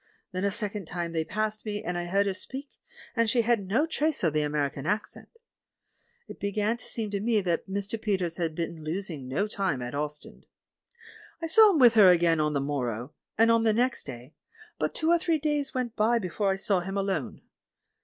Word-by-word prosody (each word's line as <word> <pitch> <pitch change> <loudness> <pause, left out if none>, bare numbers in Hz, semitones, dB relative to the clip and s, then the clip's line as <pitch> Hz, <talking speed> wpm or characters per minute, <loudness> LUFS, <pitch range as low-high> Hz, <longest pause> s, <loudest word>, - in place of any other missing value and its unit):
Then 185 0 -3
a 200 - +3
second 205 -3 -4
trnie 170 0 -3
they 160 -1 0
passed 215 +5 -2
me, 210 -1 -4
and 180 - -3
I 175 0 -2
heard 200 +3 +2
her 195 - 0
speak, 265 +9 -8 0.4
and 230 -1 +2
she 235 +1 +3
had 225 -4 +1
no 240 +11 +2
trace 315 -4 -1
of 160 -4 +2
the 155 - +2
American 145 -1 -2
accent. 210 +2 -3 1.0
It - - -10
began 210 +3 0
to - - -13
seem 220 -3 -4
to 200 - -1
me 220 +1 +2
that 175 0 -1
Mr. 200 +3 -3
Peters 185 -5 -1
had 165 -3 -2
been 165 -1 -4
losing 160 -4 -4
no 150 +11 0
time 190 -10 -1
at 120 - -5
Ostend. 150 +1 -6 0.9
I 330 - -3
saw 430 +7 +7
him - - +2
with 245 -5 +7
her 210 -4 +8
again 170 -2 +4
on 150 0 +1
the 140 - +1
morrow, 130 -2 -3 0.2
and 230 +1 +5
on 230 0 +4
the 225 -1 +3
next 245 +3 0
day, 125 +5 -9 0.5
but - - -1
two 320 - 0
or 345 - +5
three 330 -1 +1
days 295 -2 -1
went 250 -2 -2
by 230 +2 +3
before 200 0 -1
I 190 - +2
saw 195 -1 +1
him 195 +3 -4
alone. 190 -8 -2
200 Hz, 210 wpm, -28 LUFS, 165-230 Hz, 1.0 s, her